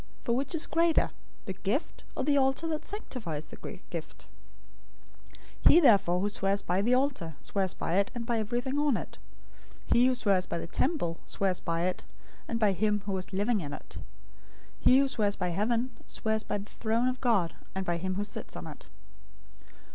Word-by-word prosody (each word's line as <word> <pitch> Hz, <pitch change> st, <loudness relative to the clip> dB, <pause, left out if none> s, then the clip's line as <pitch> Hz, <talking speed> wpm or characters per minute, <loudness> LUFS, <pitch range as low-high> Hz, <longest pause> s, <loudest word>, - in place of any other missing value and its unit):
For 235 Hz, -, +1 dB
which 275 Hz, +5 st, -1 dB
is 325 Hz, -, -1 dB
greater, 335 Hz, 0 st, +2 dB, 0.3 s
the 190 Hz, -, -3 dB
gift, 210 Hz, -, -2 dB
or -, -, 0 dB
the 285 Hz, +1 st, +3 dB
altar 270 Hz, +3 st, +2 dB
that 310 Hz, 0 st, -3 dB
sanctifies 190 Hz, -, -5 dB
the 200 Hz, -, -8 dB
gift? 170 Hz, -3 st, -7 dB, 1.4 s
023:020 -, -, +10 dB
He 335 Hz, -, +8 dB
therefore 200 Hz, -, +5 dB
who 205 Hz, -, +1 dB
swears 200 Hz, 0 st, 0 dB
by 180 Hz, +2 st, +1 dB
the 240 Hz, +5 st, +3 dB
altar, 255 Hz, -, 0 dB
swears 190 Hz, -2 st, -1 dB
by 170 Hz, -, -1 dB
it, 200 Hz, 0 st, +3 dB
and 235 Hz, -1 st, -4 dB
by 235 Hz, -1 st, 0 dB
everything 245 Hz, +6 st, -1 dB
on 290 Hz, -6 st, +3 dB
it. -, -, -8 dB, 0.7 s
023:021 -, -, +4 dB
He 245 Hz, +1 st, +6 dB
who 260 Hz, -, +2 dB
swears 195 Hz, -6 st, +2 dB
by -, -, -2 dB
the -, -, -4 dB
temple, 175 Hz, -, -1 dB
swears 190 Hz, -2 st, 0 dB
by 165 Hz, 0 st, -1 dB
it, 185 Hz, 0 st, -1 dB, 0.4 s
and 230 Hz, -, -2 dB
by 210 Hz, -3 st, +4 dB
him 210 Hz, +2 st, +1 dB
who 205 Hz, -, -2 dB
was 185 Hz, 0 st, -3 dB
living 205 Hz, +2 st, +1 dB
in 145 Hz, -2 st, -5 dB
it. -, -, -9 dB, 0.8 s
023:022 -, -, -22 dB
He 255 Hz, -, +8 dB
who 275 Hz, 0 st, +4 dB
swears 210 Hz, -6 st, 0 dB
by 180 Hz, -, -1 dB
heaven, 230 Hz, +7 st, 0 dB, 0.2 s
swears 220 Hz, 0 st, -1 dB
by -, -, -2 dB
the 205 Hz, +1 st, -8 dB
throne 230 Hz, +2 st, 0 dB
of 255 Hz, 0 st, -2 dB
God, 210 Hz, -9 st, +2 dB, 0.2 s
and 190 Hz, 0 st, -2 dB
by 175 Hz, -1 st, 0 dB
him 185 Hz, +2 st, -2 dB
who 205 Hz, -, -1 dB
sits 205 Hz, -, -6 dB
on -, -, -6 dB
it. -, -, -10 dB
210 Hz, 200 wpm, -30 LUFS, 185-255 Hz, 1.4 s, 023:020